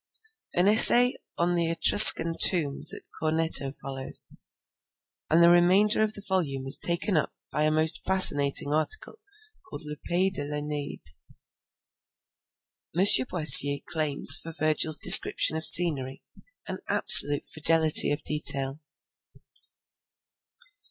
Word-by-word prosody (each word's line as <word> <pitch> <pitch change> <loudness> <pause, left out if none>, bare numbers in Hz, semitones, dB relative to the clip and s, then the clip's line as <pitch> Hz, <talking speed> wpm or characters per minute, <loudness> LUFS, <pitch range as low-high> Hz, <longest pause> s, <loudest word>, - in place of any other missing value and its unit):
An 175 +2 -3
essay 240 +4 +4 0.2
on 175 +1 -5
the 170 -1 -5
Etruscan 165 0 +5
tombs 155 -7 -2
at - - -12 0.2
Corneto 160 -3 -4
follows, 135 -1 -12 1.0
and 165 +2 -2
the 170 - +1
remainder 185 +5 -2
of 215 0 -6
the 205 - -12
volume 145 -9 -7
is 135 +2 -2
taken 175 +3 -6
up 155 - -6 0.2
by 150 - -6
a 155 - -4
most 155 +1 -4
fascinating 145 -6 0
article 155 - -5 0.6
called - - -14
Le 150 0 -13
Pays 185 +2 -4
de 145 - -8
l'Eneide. 150 - -11 1.9
M. 190 - -2 0.2
Boissier 145 -4 +5
claims 155 -3 +4
for 165 - -13
Virgil's 155 0 -3
descriptions 160 - +4
of 160 - -2
scenery 140 -6 0 0.4
an - - -11
absolute 145 0 +3
fidelity 160 0 0
of 145 - -9
detail. 140 -2 -5
155 Hz, 120 wpm, -21 LUFS, 145-175 Hz, 1.9 s, Etruscan